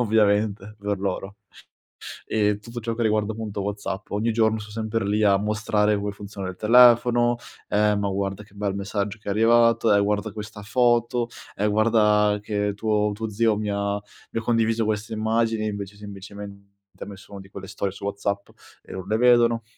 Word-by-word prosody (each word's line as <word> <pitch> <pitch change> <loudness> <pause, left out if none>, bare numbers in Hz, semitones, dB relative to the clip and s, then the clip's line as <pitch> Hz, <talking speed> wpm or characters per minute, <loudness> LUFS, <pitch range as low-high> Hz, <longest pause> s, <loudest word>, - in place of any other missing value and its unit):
ovviamente 105 -2 +1
per 100 -1 -2
loro. 95 +1 -4 0.9
E 105 -1 +1
tutto 115 +3 -8
ciò 115 0 -3
che 120 - -1
riguarda 110 0 +1
appunto 110 -2 -5
WhatsApp, 100 -1 -4
ogni 110 +3 0
giorno 110 -1 +2
son 105 0 -10
sempre 110 -1 -2
lì 105 +1 +1
a 100 -1 +5
mostrare 105 0 +1
come 100 0 -3
funziona 100 -1 -7
il 90 - -8
telefono, 120 +2 +5 0.3
ehm, 105 0 +2
"Ma 100 -1 -1
guarda 100 +1 -2
che 100 - -22
bel 100 -1 -2
messaggio 100 +1 -3
che - - -16
è - - +1
arrivato, 115 +1 +4
e 100 - +4
guarda 105 0 -1
questa 105 0 -8
foto, 120 +1 +2 0.3
e 105 - -1
guarda 105 -1 +3
che 105 -1 -1
tuo 105 -1 +1
tuo 110 +1 -4
zio 110 +1 +2
mi 105 0 -2
ha 100 0 -1 0.4
mi - - -2
ha - - -5
condiviso 115 -1 +1
queste 110 +1 -2
immagini", 110 0 0
e 110 - 0
invece 100 -1 -6
semplicemente 100 0 -10 0.3
ha - - -6
messo 100 0 -12
una 100 - -7
di 95 - -15
quelle 95 0 -9
storie 95 0 -3
su 100 - -12
WhatsApp 100 0 -3 0.3
e - - -13
non 95 0 -6
le 110 +2 +1
vedono. 120 -1 +4
105 Hz, 190 wpm, -24 LUFS, 100-110 Hz, 0.9 s, a